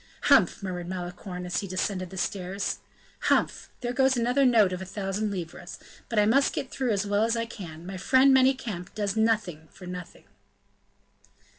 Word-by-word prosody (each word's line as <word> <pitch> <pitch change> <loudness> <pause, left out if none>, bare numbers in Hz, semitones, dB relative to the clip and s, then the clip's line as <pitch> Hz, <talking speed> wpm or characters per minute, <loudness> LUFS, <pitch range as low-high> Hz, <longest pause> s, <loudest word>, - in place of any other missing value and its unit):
"Humph!" - - +4
murmured 180 -2 -4
Malicorne 180 0 -6
as 180 - -1
he 200 - -5
descended 185 0 -2
the 190 - -9
stairs, 190 +1 -2 0.5
"Humph! - - +1
there 245 0 -2
goes 265 0 +3
another 250 +4 +2
note 215 -6 +4
of 180 - -4
a - - -3
thousand 195 +2 -2
livres! 175 -2 -6 0.3
but 230 - -3
I 210 - +5
must 270 +6 +3
get 265 - -4
through 265 -3 -1
as 205 -2 +1
well 205 +1 +1
as 230 +1 +1
I 230 - -1
can; 170 -7 -9
my 190 +1 -6
friend 265 +7 +5
Manicamp 250 -9 +1
does 205 -1 -1
nothing 215 -8 0
for 185 - -12
nothing." 180 -1 -8
200 Hz, 175 wpm, -27 LUFS, 180-230 Hz, 0.5 s, I